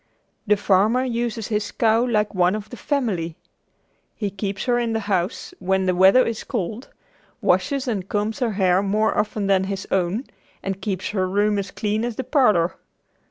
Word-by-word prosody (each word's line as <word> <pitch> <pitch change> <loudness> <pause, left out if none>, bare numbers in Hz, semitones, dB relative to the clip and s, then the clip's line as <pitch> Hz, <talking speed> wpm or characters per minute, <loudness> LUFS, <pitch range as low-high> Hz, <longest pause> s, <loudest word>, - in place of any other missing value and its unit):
The 210 0 +4
farmer 205 +5 +3
uses 235 -3 -2
his 210 -1 -1
cow 225 0 +2
like 215 -4 0
one 180 0 +2
of 215 0 -7
the - - -6
family. 210 - -2 0.8
He 205 -3 -3
keeps 195 0 -4
her 245 -2 +2
in 235 -1 -1
the 225 - -1
house 190 -2 -2
when 190 +1 +1
the 185 - +2
weather 190 +8 +6
is 230 -2 -3
cold, 220 +1 -4 0.5
washes 275 -2 +1
and 200 -6 -2
combs 210 +1 -1
her 240 -4 0
hair 190 -2 +3
more 210 +2 +1
often 210 -1 -1
than 190 -1 +3
his 195 0 -4
own, 190 +5 0 0.4
and 195 0 -4
keeps 190 -2 -2
her 185 -3 -1
room 205 +1 +2
as 195 -1 -4
clean 215 +3 -2
as 240 -2 -2
the 260 - -3
parlor. 215 - +2
210 Hz, 180 wpm, -22 LUFS, 190-230 Hz, 0.8 s, weather